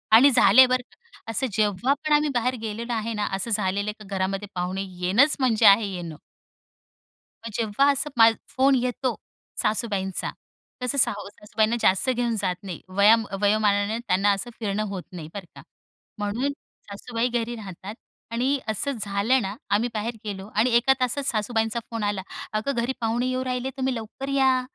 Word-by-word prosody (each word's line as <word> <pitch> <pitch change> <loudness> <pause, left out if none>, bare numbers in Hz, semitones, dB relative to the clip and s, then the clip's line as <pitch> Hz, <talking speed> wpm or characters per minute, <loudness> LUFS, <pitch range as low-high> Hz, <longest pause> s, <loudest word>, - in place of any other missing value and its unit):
आणि 270 +5 +8
झाले 260 +1 +7
बरं 255 0 +1
का, 470 0 -23
असं 260 +5 -1
जेव्हा 215 +4 +1
पण 305 +1 -2
आम्ही 295 0 +3
बाहेर 250 +2 +1
गेलेलो 230 +2 -4
आहे 230 +1 -2
ना, 210 -1 -1
असं 195 +5 -3
झालेलं 205 0 0
का 210 - -11
घरामध्ये 195 +2 -2
पाहुणे 180 +2 -2 0.2
येणंच 230 +12 +4
म्हणजे 245 -5 +2
आहे 200 +2 +7
येणं. 170 -3 -6 1.3
मग 230 - -5
जेव्हा 230 +5 +2
असं 280 +2 -1
मा 225 0 +8 0.3
फोन 270 +1 +4
येतो 250 -1 -1 0.5
सासूबाईंचा, 205 -4 -1 0.5
तसं 250 +3 -1
सा 245 -3 +4
सासूबाईंना 210 +2 -2
जास्त 190 +6 +3
घेऊन 240 -2 0
जात 180 -2 0
नाही, 185 -4 -7
वया 200 +4 +6 0.3
वयोमानाने 205 0 +2
त्यांना 205 -3 +2
असं 200 +5 -2
फिरणं 210 -1 -1
होत 195 -3 -5
नाही 170 -4 -8
बरं 200 -3 -7
का. - - -11 0.6
म्हणून 215 +7 -1 0.4
सासूबाई 230 +4 -2
घरी 240 -1 -2
राहतात 200 -1 -8 0.4
आणि 260 +4 0
असं 220 +6 -1
झालं 205 +6 +1
ना, 195 +1 -4
आम्ही 220 +4 +1
बाहेर 220 +2 -3
गेलो 195 -2 -5
आणि 225 +4 +3
1 250 +3 +5
तासात 255 +3 0
सासूबाईंचा 225 -1 0
फोन 230 -2 -4
आला, 205 -2 -1 0.4
"अगं 265 +6 -2
घरी 255 +3 -1
पाहुणे 235 +2 0
येऊ 255 0 -1
राहिले 255 0 -2
तुम्ही 260 -1 -1
लवकर 230 +5 -6
या, 265 -2 +3
225 Hz, 165 wpm, -25 LUFS, 205-255 Hz, 1.3 s, आणि